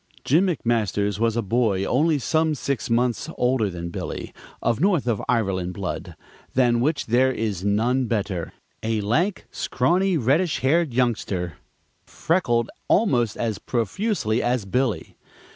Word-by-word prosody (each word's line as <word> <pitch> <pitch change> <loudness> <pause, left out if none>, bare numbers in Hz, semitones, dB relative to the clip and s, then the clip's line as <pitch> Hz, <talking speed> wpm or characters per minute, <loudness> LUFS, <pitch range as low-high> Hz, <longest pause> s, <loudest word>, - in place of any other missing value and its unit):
Jim 165 +8 +4
McMasters 105 - 0
was 115 0 +1
a 115 - 0
boy 105 -2 +1
only 150 +7 +2
some 155 +3 +1
six 140 -2 -3
months 120 0 +1
older 125 -4 +2
than 85 -1 -6
Billy, - - -5 0.3
of 120 0 0
North 180 -7 +2
of 115 -4 0
Ireland 95 -6 0
blood 95 -3 -5 0.4
than 120 -2 +3
which 145 +2 0
there 125 +3 +3
is 105 -7 -3
none 120 +6 +1
better 100 -7 -2 0.3
a 110 -1 -1
lank, 165 - 0
scrawny, 175 +8 +1
reddish 150 +7 +1
haired 155 +3 +2
youngster, 105 - -1 0.5
freckled 140 -9 0 0.2
almost 125 - +2
as 110 -4 -2
profusely 120 - -1
as 120 -3 0
Billy. 125 +3 -1
120 Hz, 135 wpm, -23 LUFS, 105-140 Hz, 0.5 s, Jim